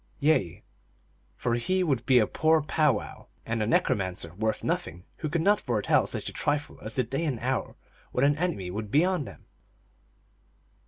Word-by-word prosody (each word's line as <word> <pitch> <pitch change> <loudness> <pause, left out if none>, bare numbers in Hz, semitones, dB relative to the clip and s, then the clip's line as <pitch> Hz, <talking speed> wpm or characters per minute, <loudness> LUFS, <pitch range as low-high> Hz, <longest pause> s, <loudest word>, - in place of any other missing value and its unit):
Yea, 140 - +1 0.7
for 120 - -1
he 185 +11 +1
would 135 -8 0
be 130 - +6
a 110 - +5
poor 160 +6 +2
powwow 150 -6 0 0.2
and 115 0 -1
a 105 - 0
necromancer 95 -7 0
worth 110 +3 -2
nothing 90 +4 -3
who 155 - -3
could 160 +2 0
not 205 +2 +4
foretell 115 -5 +2
such - - -4
a - - -4
trifle 145 0 -2
as 110 - -5
the 130 - +2
day 135 +7 -3
and 140 -8 -1
hour 130 +1 -2 0.4
when 125 - +2
an 145 +1 +4
enemy 160 - -2
would 105 +2 -5
be 150 - +4
on 185 -6 0
them - - -12
130 Hz, 175 wpm, -27 LUFS, 110-155 Hz, 0.7 s, be